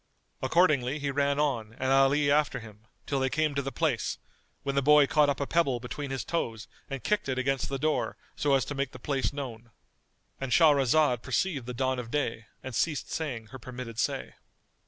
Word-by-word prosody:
Accordingly 150 -6 +3
he 140 -1 -2
ran 140 +1 +1
on 120 -7 0
and 130 +2 -1
Ali 135 +2 +4
after 145 -3 +2
him, 110 -1 -14 0.2
till 140 - -1
they 130 0 +1
came 155 +1 +1
to 140 - 0
the 135 0 -4
place, 140 -9 0 0.5
when 140 - -1
the 140 - +2
boy 150 +1 +6
caught 150 +1 +3
up 140 - -1
a 140 - 0
pebble 140 -6 +1
between 135 +4 -5
his 135 -3 -3
toes 120 -9 -3 0.2
and 135 -2 -5
kicked 210 -8 0
it 130 - -1
against 135 +1 0
the 135 - -2
door 155 +3 0 0.2
so 145 -2 +2
as 135 - +1
to - - -4
make 140 -2 -2
the - - -8
place 135 +1 -1
known.——And 125 0 -10
Shahrazad 145 -4 +4
perceived 135 +1 -1
the 125 - -5
dawn 130 +1 0
of 120 -2 -6
day 115 -5 -2 0.2
and 130 - -6
ceased 150 +4 -1
saying 125 -9 -4
her 130 - -8
permitted 120 -1 -7
say. 65 - -1
135 Hz, 200 wpm, -29 LUFS, 125-145 Hz, 0.5 s, boy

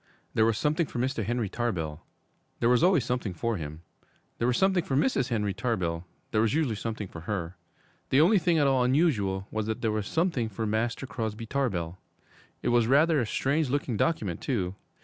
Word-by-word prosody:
There 110 0 +4
was 115 -2 +1
something 155 +3 +1
for - - -7
Mr. 125 -1 0
Henry 120 0 -1
Tarbell 85 -9 -3 0.6
there 115 - +3
was 125 -1 +4
always 175 -8 +4
something 125 -7 -2
for 115 +5 -1
him; 80 0 -7 0.6
there 115 - +1
was 125 - +2
something 190 -2 +3
for 135 - -2
Mrs. 135 - +2
Henry 105 -4 0
Tarbell 90 -7 -2 0.2
there 110 - +2
was 110 +2 +2
usually 155 -7 +1
something 110 -1 -4
for 85 - -9
her. 90 -4 -3 0.5
The 135 - +4
only 190 +7 +5
thing 170 -1 +2
at 145 - +4
all 135 -2 +3
unusual 115 - +1
was 110 -1 -2
that 110 - -3
there 110 - +1
was 105 -2 -2
something 160 -9 0
for 110 +2 -3
Master 115 +4 -1
Crosby 115 -3 -4
Tarbell. 95 -10 -2 0.6
It - - +1
was 120 -1 +3
rather 150 +4 +4
a 120 - 0
strange 140 +5 0
looking 135 -3 -1
document, 105 - 0
too. 95 -9 -1
115 Hz, 195 wpm, -28 LUFS, 105-140 Hz, 0.6 s, only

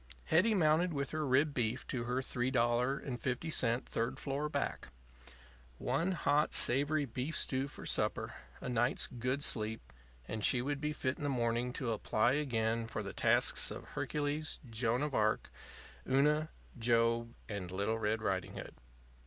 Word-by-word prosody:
Hetty 205 +7 +3
mounted 165 0 +3
with 140 -1 -2
her 155 -2 -1
rib 140 +3 +3
beef 120 0 -1
to 120 -3 -3
her 125 +2 0
$3.50 125 +1 0
third 115 +1 -2
floor 145 +2 -2
back. - - -2 0.9
One 165 +9 0
hot, 150 -3 +2
savory 145 +4 +3
beef 130 +5 -3
stew 130 +1 0
for - - -10
supper, - - 0 0.3
a - - -6
night's 120 +1 +1
good 125 +3 -2
sleep, 110 - -2 0.3
and 110 -1 -4
she 125 - +5
would 140 +3 -2
be 150 0 0
fit 130 -3 -2
in - - -7
the 145 - 0
morning 120 -1 0
to 125 -3 -2
apply 110 +2 +2
again 115 -5 0
for 110 -1 -4
the 100 - -6
tasks - - +3
of - - -8
Hercules, 150 +1 -2
Joan 115 +3 +1
of 150 -2 -2
Arc, 110 -2 +1 0.6
Una, 150 +4 +3 0.3
Job, 115 0 +2
and 100 -4 -5
Little 100 +4 -1
Red 110 0 0
Riding 95 -3 -1
Hood. - - -7
125 Hz, 155 wpm, -34 LUFS, 115-145 Hz, 0.9 s, she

